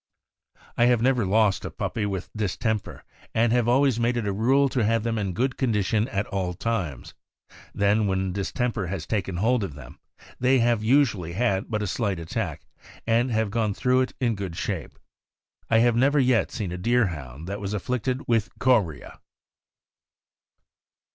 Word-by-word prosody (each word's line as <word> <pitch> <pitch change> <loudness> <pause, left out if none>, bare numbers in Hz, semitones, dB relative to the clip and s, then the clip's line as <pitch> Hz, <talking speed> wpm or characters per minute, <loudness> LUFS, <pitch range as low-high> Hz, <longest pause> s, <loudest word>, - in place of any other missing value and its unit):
I 120 - +5
have 120 -2 +3
never 125 -5 +2
lost 105 0 +2
a - - -4
puppy 105 -2 -3
with 95 -2 -4
distemper, 105 +1 -2 0.3
and 115 +1 +3
have 120 -2 +2
always 130 -1 +3
made 120 +1 +1
it 115 - -2
a 100 - -1
rule 130 +7 +3
to 125 -3 0
have 115 +1 +1
them 115 -1 -1
in 100 -3 -2
good 130 +7 -1
condition 110 -3 +1
at 100 -5 -2
all 95 -3 -3
times; 90 - -3 0.6
then 100 +1 +2
when 95 -1 -1
distemper 105 +1 -2
has 85 -3 -4
taken 95 0 -2
hold 115 +4 +2
of 80 -8 -5
them, 65 -5 -12 0.4
they 130 +1 +4
have 120 -2 +2
usually 110 - +2
had 100 -2 0
but 105 -2 -1
a - - -1
slight 100 0 -1
attack, 85 0 -4 0.4
and 115 +3 +2
have 110 -3 0
gone 110 -2 0
through 130 0 +2
it 130 - -2
in 120 -3 +1
good 95 -5 -5
shape. - - -4 0.7
I 115 - +4
have 120 0 +4
never 140 +4 +3
yet 125 -4 +3
seen 105 -8 -4
a 90 - -5
Deer 120 +4 +3
hound 70 +2 -9
that 100 +2 -5
was 100 +1 -3
afflicted 125 +5 -2
with 115 -2 +1
chorea. 110 - 0
110 Hz, 175 wpm, -25 LUFS, 95-120 Hz, 0.7 s, I